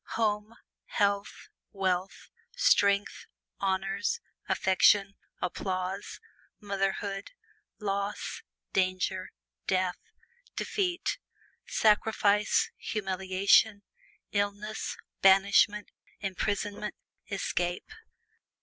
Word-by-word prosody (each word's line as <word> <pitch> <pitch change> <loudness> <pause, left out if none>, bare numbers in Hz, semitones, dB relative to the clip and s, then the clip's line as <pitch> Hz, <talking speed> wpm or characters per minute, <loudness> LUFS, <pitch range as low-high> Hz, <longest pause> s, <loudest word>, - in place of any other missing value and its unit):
Home, 215 0 0 0.3
health, 200 -1 -1 0.2
wealth, 190 -1 -2 0.2
strength, 200 0 +3 0.3
honors, 195 - 0 0.3
affection, 195 +1 +4 0.3
applause, 185 +1 -3 0.4
motherhood, 195 - -2 0.4
loss, 200 -1 -3 0.3
danger, 185 0 0 0.4
death, 185 -1 +1 0.6
defeat, 365 0 -1 0.5
sacrifice, 210 -1 +3
humiliation, 195 +1 +2 0.5
illness, 205 +1 -2 0.2
banishment, 200 +2 +5 0.3
imprisonment, 205 +1 -2 0.3
escape. 180 - -2
200 Hz, 60 wpm, -29 LUFS, 190-210 Hz, 0.6 s, banishment